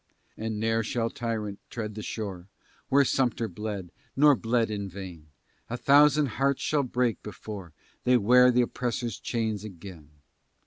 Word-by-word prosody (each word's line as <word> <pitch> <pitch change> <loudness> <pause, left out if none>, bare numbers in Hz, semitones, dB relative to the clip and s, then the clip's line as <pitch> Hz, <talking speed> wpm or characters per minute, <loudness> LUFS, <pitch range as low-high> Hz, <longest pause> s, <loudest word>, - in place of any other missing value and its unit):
And 110 -1 -4
ne'er 115 +1 +1
shall 115 +1 -1
tyrant 110 -4 -3
tread 110 -3 -5
the 110 - -6
shore 95 -5 -5 0.4
Where 140 +1 +5
Sumter 120 -3 +1
bled, 100 -2 -5 0.2
nor 145 +1 +6
bled 115 -1 0
in 100 -2 -3
vain; 90 -4 -9 0.4
A 120 - -3
thousand 145 +3 +5 0.2
hearts 140 0 +2
shall 150 -2 +2
break, 125 -3 0
before 105 -4 -8 0.3
They 125 0 +5
wear 125 +3 +6
the 125 0 +4
oppressor's 120 -1 -3
chains 110 -4 -2
again. 90 -6 -10
115 Hz, 145 wpm, -27 LUFS, 100-125 Hz, 0.4 s, nor